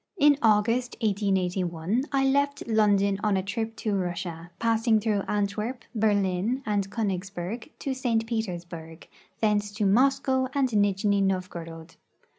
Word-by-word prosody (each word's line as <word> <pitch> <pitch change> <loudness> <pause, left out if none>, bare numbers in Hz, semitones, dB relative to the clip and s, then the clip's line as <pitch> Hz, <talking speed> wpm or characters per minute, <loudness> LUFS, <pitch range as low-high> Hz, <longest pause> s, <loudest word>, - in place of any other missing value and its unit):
In 295 -3 +6
August, 230 +3 +2
1881, 190 0 0
I 270 -1 +2
left 280 +1 +1
London 205 -3 +3
on 210 -2 +2
a 190 - -1
trip 225 +3 -3
to 215 -2 -2
Russia, 175 -2 -4
passing 225 -1 +2
through 210 -2 0
Antwerp, 210 +4 -2
Berlin, 205 +2 +1
and 205 -2 0
Konigsberg 195 - -3
to 275 - -3
St. 235 -4 0
Petersburg; 175 -7 -5 0.3
thence 210 -1 +1
to 210 0 -1
Moscow 260 +4 +3
and 270 -2 +2
Nijni 205 -1 +2
Novgorod. 170 -4 -3
210 Hz, 125 wpm, -27 LUFS, 190-230 Hz, 0.3 s, In